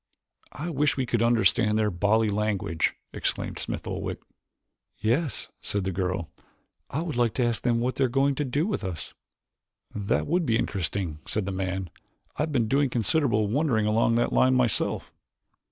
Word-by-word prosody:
"I 165 +5 -4
wish 145 -1 +1
we 130 - +1
could 120 -2 0
understand 115 -2 +3
their 105 -1 +2
bally 105 +5 +2
language," 100 -5 0 0.2
exclaimed - - -2
Smith - - -4
Oldwick. - - -3 0.8
"Yes," 125 +6 0
said 100 -1 -2
the 95 - -1
girl, 90 -2 -2 0.6
"I 155 +5 -2
would 160 -6 -4
like 120 -2 +2
to 125 - +2
ask 120 -1 0
them 120 -2 +2
what 125 +2 -1
they 135 - +3
are - - 0
going 135 +3 +2
to 150 - -1
do 145 +4 0
with 205 - -2
us." 90 -4 -5 0.8
"That 100 -1 0
would 175 +4 +1
be 115 -7 +2
interesting," 90 -6 -2
said 105 -2 -1
the 100 - -2
man. 95 -2 -3 0.4
"I - - -2
have 155 +1 0
been 120 -6 +1
doing 140 +3 +2
considerable 120 -2 +2
wondering 120 -2 +1
along 115 +2 +3
that 120 - +1
line 130 0 +4
myself." 125 -4 +1
115 Hz, 175 wpm, -27 LUFS, 100-135 Hz, 0.8 s, line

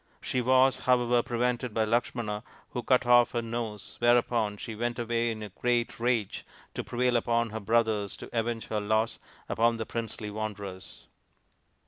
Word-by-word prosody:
She 130 - -1
was, 130 +2 +4
however, 125 -1 +3
prevented 120 -1 -1
by 110 -1 +2
Lakshmana, 115 -2 -1 0.3
who 120 - -3
cut 125 +2 +3
off 120 0 +5
her 120 - 0
nose, 115 -3 -4
whereupon 120 -3 +2
she 115 - -6
went 120 +2 -2
away 120 0 0
in 110 -1 -4
a 105 - -6
great 120 +4 -1
rage 115 -4 0 0.3
to - - -3
prevail 125 0 0
upon 115 -1 +1
her 110 - -4
brothers 110 -1 +1
to - - -9
avenge 115 0 -1
her 105 -1 -1
loss 110 +2 0 0.3
upon 115 +1 +2
the 110 - -3
princely 110 -2 -5
wanderers. 105 -3 -6
115 Hz, 160 wpm, -29 LUFS, 110-120 Hz, 0.3 s, off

